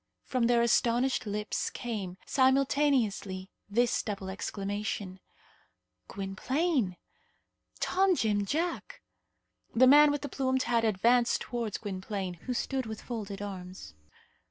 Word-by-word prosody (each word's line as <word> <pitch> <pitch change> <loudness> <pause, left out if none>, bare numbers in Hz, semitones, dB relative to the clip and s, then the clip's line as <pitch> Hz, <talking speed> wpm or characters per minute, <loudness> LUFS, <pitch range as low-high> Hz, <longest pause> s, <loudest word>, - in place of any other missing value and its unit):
From 250 -3 0
their 235 -1 +4
astonished 240 +1 +2
lips 210 +1 -2
came, 205 -7 -5
simultaneously, 260 -8 +1 0.2
this 235 +3 +2
double 195 -3 -5
exclamation: 200 -1 -4 0.9
"Gwynplaine!" 210 - -1 0.8
"Tom 380 0 +2
Jim 210 -7 +1
Jack!" 325 - -3 0.7
The 255 +3 +7
man 295 +3 +8
with 290 0 -1
the - - -2
plumed 260 -1 0
hat 235 -1 +1
advanced 235 +3 +3
towards 235 -4 -3
Gwynplaine, 195 -2 -4
who 250 - 0
stood 265 -1 -2
with 220 -1 -6
folded 205 -4 -5
arms. 185 - -8
230 Hz, 110 wpm, -30 LUFS, 200-260 Hz, 0.9 s, man